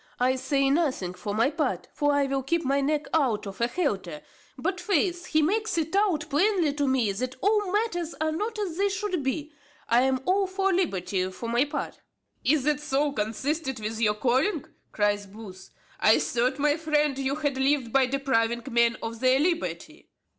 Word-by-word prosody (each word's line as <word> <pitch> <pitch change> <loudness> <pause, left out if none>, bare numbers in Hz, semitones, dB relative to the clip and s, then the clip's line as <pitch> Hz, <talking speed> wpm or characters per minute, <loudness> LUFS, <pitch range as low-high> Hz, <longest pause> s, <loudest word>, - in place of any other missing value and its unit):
I 255 +1 +3
say 270 +1 +1
nothing 275 - 0
for 195 +3 -5
my 230 +6 +2
part, 310 0 -2
for 290 -1 +1
I 285 -1 +2
will 275 0 -1
keep 330 +4 -1
my 275 +1 +2
neck 295 +1 0
out 260 -10 +1
of 195 +2 -8
a 235 - +3
halter; 195 - -2 0.4
but, 365 +7 -2
faith, 360 -1 0
he 310 -1 +2
makes 420 +4 0
it 325 +2 -1
out 365 -7 +2
plainly 340 0 +2
to 290 -1 -1
me 255 -6 +2
that 250 +6 -4
all 415 +1 +1
matters 370 -6 -1
are 315 0 0
not 425 +8 -3
as 375 -6 -3
they 400 +1 +2
should 385 -3 -2
be. 290 +3 -3 0.3
I 235 +1 +4
am 260 0 +1
all 385 +1 +2
for 385 +1 0
liberty, 190 - 0
for 210 +5 -7
my 240 +4 +2
part." 290 - -5 0.4
"Is 290 0 +2
that 295 0 +1
so 295 0 0
consistent 265 +4 -2
with 220 +1 -4
your 210 -2 +3
calling?" 265 - +1 0.3
cries 205 -1 0
Booth. 195 -2 -11 0.3
"I - - +5
thought, 250 +3 0
my 295 +1 +2
friend, 300 -3 +1
you 270 +1 -1
had 290 -3 -1
lived 265 -3 +1
by 265 -2 +4
depriving 235 -3 0
men 235 0 +3
of 225 0 -5
their 255 +1 +3
liberty." 335 +2 -2
280 Hz, 190 wpm, -26 LUFS, 235-330 Hz, 0.4 s, I